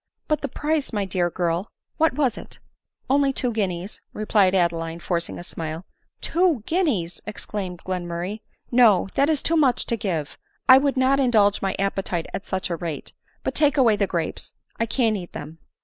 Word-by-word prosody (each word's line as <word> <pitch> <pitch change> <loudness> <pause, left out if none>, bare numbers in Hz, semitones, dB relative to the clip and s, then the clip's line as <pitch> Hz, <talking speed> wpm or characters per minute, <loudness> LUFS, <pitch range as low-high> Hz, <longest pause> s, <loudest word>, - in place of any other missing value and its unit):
" - - -54
But 305 -1 +1
the 280 - -1
price, 300 +2 -1
my 205 -3 -1
dear 180 -2 0
girl! 175 +2 -1
— - - -50
what 320 +1 +3
was 265 -6 +1
it? - - -10 0.2
" - - -60
" - - -48
Only 275 0 +4
two 250 -2 -1
guineas, 190 -3 -3
" - - -49
replied 205 -3 +2
Adeline, 170 -2 0
forcing 170 -1 -2
a - - -7
smile. 160 0 -5 0.2
" - - -48
Two 335 - +2
guineas! 235 - 0
" - - -42
exclaimed 195 -4 -5
Glenmurray; 180 +2 -3 0.2
" - - -41
No, 205 -5 +5
that 280 +2 +3
is 305 -3 +1
too 330 - +2
much 280 -6 +3
to 235 - 0
give 170 -9 -3
— - - -43
1 260 0 +8
would 275 -1 0
not 265 +1 +3
indulge 215 -6 +3
my 195 -1 -1
appetite 195 -3 -1
at 195 - -5
such 190 -1 -2
a - - +1
rate— 165 -3 -5 0.3
but, - - -1
take 295 -1 +3
away 235 -5 +5
the 200 -1 +1
grapes 170 -3 -3
— - - -36
I 230 - +1
can't 225 -3 +1
eat 175 -3 -8
them." 155 +2 -8
200 Hz, 215 wpm, -24 LUFS, 175-265 Hz, 0.3 s, 1